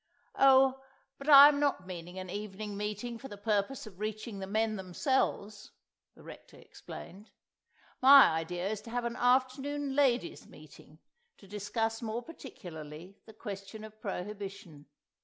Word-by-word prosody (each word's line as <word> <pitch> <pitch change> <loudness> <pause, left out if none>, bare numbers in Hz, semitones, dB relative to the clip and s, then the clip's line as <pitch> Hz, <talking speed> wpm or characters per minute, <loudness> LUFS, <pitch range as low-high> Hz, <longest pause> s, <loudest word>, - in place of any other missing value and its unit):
"Oh, 265 0 +5 0.4
but 275 +2 -5
I 280 -1 +11
am 290 -1 +2
not 280 -10 0
meaning 180 0 -8
an 185 0 -6
evening 205 +1 -6
meeting 210 +3 -5
for 270 - -9
the 205 - -10
purpose 210 +5 -1
of 195 -4 -13
reaching 215 0 -5
the 190 - -6
men 215 +2 0
themselves," 205 +1 -2 0.5
the - - -17
Rector - - -13
explained. 200 +4 -12 0.7
"My 275 +1 +9
idea 170 +3 -3
is 210 0 -3
to 230 - -12
have 240 +1 -3
an 235 0 -3
afternoon 265 +3 0
Ladies' 280 +4 +1
Meeting - - -16 0.4
to 200 - -17
discuss 220 +3 -3
more 230 +1 -4
particularly 175 - -11
the 220 - -13
question 205 0 -8
of 215 0 -13
prohibition. 195 -5 -7
215 Hz, 145 wpm, -31 LUFS, 195-255 Hz, 0.7 s, I